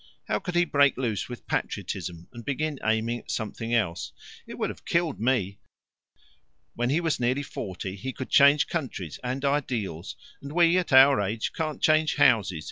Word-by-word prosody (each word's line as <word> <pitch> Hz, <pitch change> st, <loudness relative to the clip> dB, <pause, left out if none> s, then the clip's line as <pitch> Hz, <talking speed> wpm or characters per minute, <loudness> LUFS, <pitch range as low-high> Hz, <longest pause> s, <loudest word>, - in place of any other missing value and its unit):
How 105 Hz, -, 0 dB
could 180 Hz, -, -5 dB
he 175 Hz, 0 st, +4 dB
break 140 Hz, -3 st, +3 dB
loose 115 Hz, -5 st, -2 dB
with 120 Hz, -, -9 dB
Patriotism 85 Hz, -1 st, -4 dB
and 120 Hz, -1 st, -9 dB
begin 145 Hz, +2 st, -2 dB
aiming 110 Hz, +2 st, 0 dB
at -, -, -18 dB
something 115 Hz, +1 st, -4 dB
else? 100 Hz, -8 st, -1 dB, 0.3 s
It -, -, -8 dB
would -, -, -1 dB
have -, -, -14 dB
killed 170 Hz, -4 st, 0 dB
me. 110 Hz, -5 st, 0 dB, 1.1 s
When 120 Hz, +1 st, -1 dB
he 150 Hz, +5 st, +2 dB
was 165 Hz, -3 st, -1 dB
nearly 125 Hz, +4 st, 0 dB
forty 95 Hz, -6 st, -6 dB
he 115 Hz, +7 st, -5 dB
could 130 Hz, -, -7 dB
change 140 Hz, +1 st, +6 dB
countries 115 Hz, -, -5 dB
and 130 Hz, +3 st, -3 dB
ideals 120 Hz, -, -2 dB, 0.3 s
and 140 Hz, +1 st, -8 dB
we, 170 Hz, 0 st, +4 dB
at 180 Hz, -, -4 dB
our 135 Hz, -1 st, +7 dB
age, 105 Hz, +3 st, -2 dB
can't 155 Hz, -2 st, -4 dB
change 155 Hz, 0 st, +3 dB
houses. 105 Hz, -, +3 dB
125 Hz, 175 wpm, -26 LUFS, 110-145 Hz, 1.1 s, our